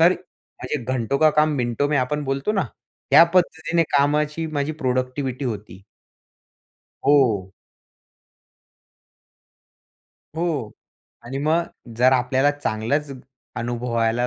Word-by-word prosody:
तर 170 +3 +6
माझे 175 -5 -8
घंटो 130 +1 -1
का 155 -1 +5
काम 150 0 +2
मिनटों 120 +3 0
में 150 - +1
आपण 145 +3 -1
बोलतो 135 +9 -1
ना 195 -3 +1 0.5
ह्या 165 - +9
पद्धतीने 170 -1 +2
कामाची 150 +3 +1
माझी 150 -1 -2
प्रोडक्टिव्हिटी 130 -1 -2
होती. 105 -5 -6 1.2
हो. 115 -10 +3 2.8
हो 160 -10 -2 0.5
आणि 135 +3 -5
मग 155 +4 +2 0.3
जर 130 +2 +5
आपल्याला 130 +2 +2
चांगलंच 145 +1 -2 0.5
अनुभवायला 115 0 -1
140 Hz, 100 wpm, -22 LUFS, 120-150 Hz, 2.8 s, ह्या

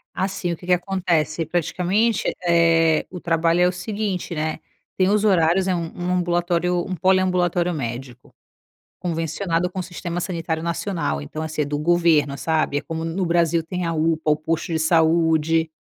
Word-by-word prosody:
Assim, 190 -2 -2
o 165 - -3
que 175 - -13
que 180 - +3
acontece? 175 -4 0
Praticamente, 180 +7 0
eh, 165 -2 +3
o 180 - -7
trabalho 165 +1 +1
é 180 - +5
o - - +1
seguinte, 195 -2 -4
né: 155 +1 -2 0.4
tem 185 0 +3
os 210 0 +2
horários, 185 -1 +3
é 185 - +1
um 170 -1 -2
um 175 +1 -3
ambulatório 175 0 0
um 185 - -4
poliambulatório 180 -1 +2
médico 125 -2 -6 0.7
convencionado 165 +1 -1
com 190 - -7
o - - -2
sistema 175 0 -5
sanitário 165 -3 -3
nacional, 170 - -2
então, 155 - -6
assim, 155 -1 -2
é - - 0
do 145 +1 -3
governo, 155 -4 +2
sabe? 155 -1 0
É - - -4
como 160 0 -5
no 165 +3 -2
Brasil. 170 -1 +2
Tem 180 +1 -4
a 165 - -1
UPA, 160 0 0
o 150 - +2
posto 160 +1 -2
de - - +1
saúde. 160 0 +2
170 Hz, 175 wpm, -22 LUFS, 160-180 Hz, 0.7 s, é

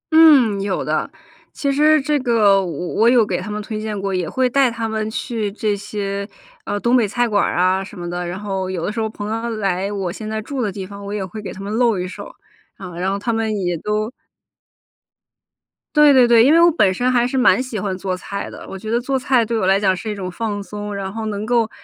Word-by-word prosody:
嗯， 270 -11 +6
有 195 -2 -2
的。 155 +1 -1 0.4
其 280 -1 -1
实 305 +2 +4
这 295 +1 0
个 215 -6 +3
我 175 0 -4
我 230 +2 +4
有 240 -3 +5
给 - - -2
他 210 - -7
们 210 0 -3
推 215 0 -5
荐 215 -2 -4
过， 195 0 -2
也 180 -3 -1
会 260 -1 +1
带 265 0 +3
他 230 -1 -3
们 220 0 -2
去 220 -2 -3
这 210 0 -1
些， 200 0 -4 0.4
呃， 205 - -2
东 240 +4 +2
北 230 -4 +3
菜 240 +4 0
馆 205 -3 +2
儿 - - -1
啊， 185 +2 +2
什 200 0 -11
么 175 - -5
的， 175 +1 -3
然 180 +2 -5
后 195 -2 -3
有 175 -3 -3
的 - - -1
时 225 - -4
候 220 0 -1
朋 210 -1 -6
友 230 +1 -2
来 195 -1 -1
我 195 -4 -3
现 215 +3 -7
在 220 0 -2
住 265 +3 -4
的 210 -3 -1
地 190 -1 -6
方， 200 +1 -10
我 200 - -6
也 205 -2 -2
会 200 +4 -8
给 195 -3 -6
他 195 - -9
们 205 +2 -5
露 230 -3 +2
一 180 0 -3
手， - - -9 0.5
啊， 180 -3 -9
然 190 +1 0
后 200 - -1
他 230 +3 -2
们 220 -1 -1
也 175 -2 -1
都 210 +6 -2 1.8
对 300 -1 +7
对 255 -3 +6
对。 235 -1 +6
因 270 - +5
为 330 - +6
我 340 0 +6
本 205 - +3
身 245 +7 0
还 240 -1 +3
是 265 +1 -2
蛮 255 0 +4
喜 250 -5 -4
欢 190 -1 -2
做 185 -1 -3
菜 200 +2 -6
的， - - -10
我 195 - -6
觉 215 +3 -7
得 235 +2 +2
做 265 +2 -1
菜 250 -3 +2
对 230 0 -1
我 190 - 0
来 195 +1 +4
讲 190 -2 +2
是 215 +4 -6
一 210 - -3
种 190 -2 -5
放 205 0 -3
松。 205 0 -6
然 195 -1 -4
后 225 0 -4
能 210 0 -3
够 230 -1 +2
210 Hz, 275 characters per minute, -20 LUFS, 195-235 Hz, 1.8 s, 对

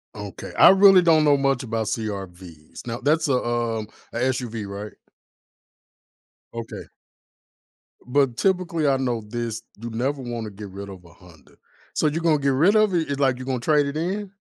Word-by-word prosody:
Okay. - - -8
I - - +9
really 195 -1 +7
don't 160 -3 +4
know 145 -1 +4
much 135 -2 0
about 115 -3 -2
CR-Vs. 95 -6 -7
Now, 120 0 -4
that's 150 +4 +1
a, 140 - +1
um, 120 -3 -1 0.3
a - - -3
SUV, 120 -4 -2
right? 100 +2 -7 1.6
Okay. 115 -1 -7 1.2
But, 125 -2 +1
typically, 175 -4 0
I 135 -1 +3
know 125 -3 -1
this, 115 +1 -5 0.2
you 120 - -5
never 130 +5 -2
wanna 120 -3 -5
get 100 0 -9
rid 100 +1 -8
of 95 -2 -11
a - - -15
Honda. 85 -5 -19 0.4
So - - +1
you're 155 +3 -1
gonna 165 -2 +3
get 140 -1 0
rid 170 +11 +4
of 215 -3 +4
it? 165 -3 0
It's 140 0 -2
like 130 -3 +2
you 130 - -7
gonna 130 -1 -2
trade 145 +3 +2
it 140 +2 -4
in? 190 +4 -3
125 Hz, 180 wpm, -23 LUFS, 110-150 Hz, 1.6 s, I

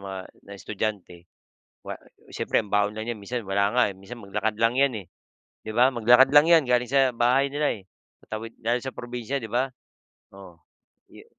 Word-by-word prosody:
mga 95 -1 -6 0.3
na - - -9
estudyante, 95 -4 -5 0.6
wa - - -7 0.3
siyempre - - 0
ang 100 - -15
baon 105 +1 +1
lang 110 +2 -4
'yan 110 - -7
minsan 120 +3 -5
wala 100 +3 0
nga, 125 - +5
eh, - - -14
minsan 110 +4 -11
maglakad 105 +2 -2
lang 115 +4 +1
'yan, 125 -8 +1
eh. - - -25 0.6
'Di 110 - -5
ba, 125 +3 +5
maglakad 120 +3 +5
lang 145 +2 +6
'yan 165 -3 +6
galing 125 -1 +1
sa 135 0 +3
bahay 125 +4 +2
nila, 145 -2 0
eh. 100 - -14 0.4
Tatawid 115 +1 -7
dahil 120 +2 +1
sa 130 - -7
probinsiya, 120 +2 -5
di 110 - -7
ba? 125 +3 +1 0.7
Oo 90 -4 -14 0.5
yu - - -15
115 Hz, 190 wpm, -25 LUFS, 105-125 Hz, 0.7 s, lang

